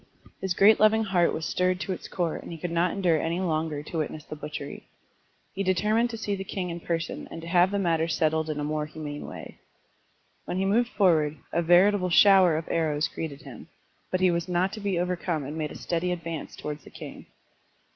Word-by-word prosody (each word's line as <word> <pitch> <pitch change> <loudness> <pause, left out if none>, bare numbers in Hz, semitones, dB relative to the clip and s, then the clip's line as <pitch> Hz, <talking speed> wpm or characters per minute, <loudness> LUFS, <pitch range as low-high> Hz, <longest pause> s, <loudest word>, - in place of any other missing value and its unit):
His 190 -2 -1
great 210 +4 +6
loving 220 +1 +5
heart 180 -5 +2
was 160 - -3
stirred 180 0 +1
to - - -3
its - - -8
core 170 -3 -2
and - - -8
he 165 - -6
could 175 +1 -4
not 170 +2 +2
endure 175 -5 +1
any 165 +2 -1
longer 155 -4 -1
to 165 - -6
witness 155 0 -4
the - - -7
butchery. 150 -1 -7 0.7
He 195 - -3
determined 210 +5 +2
to 230 - -5
see 205 -2 -2
the 195 - -5
king 185 -2 -4
in 170 - -5
person 165 -1 -3
and - - -7
to - - -7
have 175 +1 +4
the 200 - -1
matter 165 -4 +1
settled 160 -1 0
in 150 -1 -2
a - - -2
more 150 0 -2
humane 150 -1 -7
way. - - -10 0.9
When - - -3
he 190 - +1
moved 230 +5 +2
forward, 155 -8 +2 0.2
a 170 - +2
veritable 180 +3 +4
shower 185 -2 +6
of 160 - -5
arrows 155 -2 0
greeted 150 -4 -6
him, - - -11 0.4
but 185 - -1
he 185 -1 +5
was 170 0 -1
not 180 +2 +1
to 215 - -6
be 200 -3 -1
over 180 +1 0
come 170 -3 -2
and 145 +3 -6
made 155 -1 -2
a - - -8
steady 175 +1 -1
advance 165 -3 -5
towards 150 -1 -6
the - - -13
king. - - -10
170 Hz, 220 wpm, -27 LUFS, 155-190 Hz, 0.9 s, great